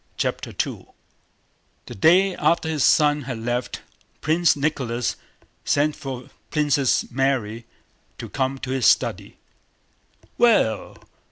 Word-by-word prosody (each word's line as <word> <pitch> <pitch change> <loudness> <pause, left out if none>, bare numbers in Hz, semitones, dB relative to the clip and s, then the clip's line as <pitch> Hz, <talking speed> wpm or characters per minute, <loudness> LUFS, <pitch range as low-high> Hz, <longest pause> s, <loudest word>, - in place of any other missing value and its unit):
CHAPTER - - -2 0.2
II - - -9 1.0
The - - -9
day 180 - +4
after 170 -1 +1
his 155 -4 0
son 150 -1 +4
had 125 -3 -5
left, 120 +2 -3 0.4
Prince 165 +2 +2
Nicholas 130 -5 -2 0.5
sent 150 +1 +1
for 130 -2 -8 0.2
Princess 145 -4 +1
Mary 120 -4 -1 0.5
to - - -7
come 135 0 -2
to 130 -1 -6
his 130 -2 +2
study. - - +1 1.0
"Well? 160 - +2
135 Hz, 110 wpm, -23 LUFS, 125-155 Hz, 1.0 s, day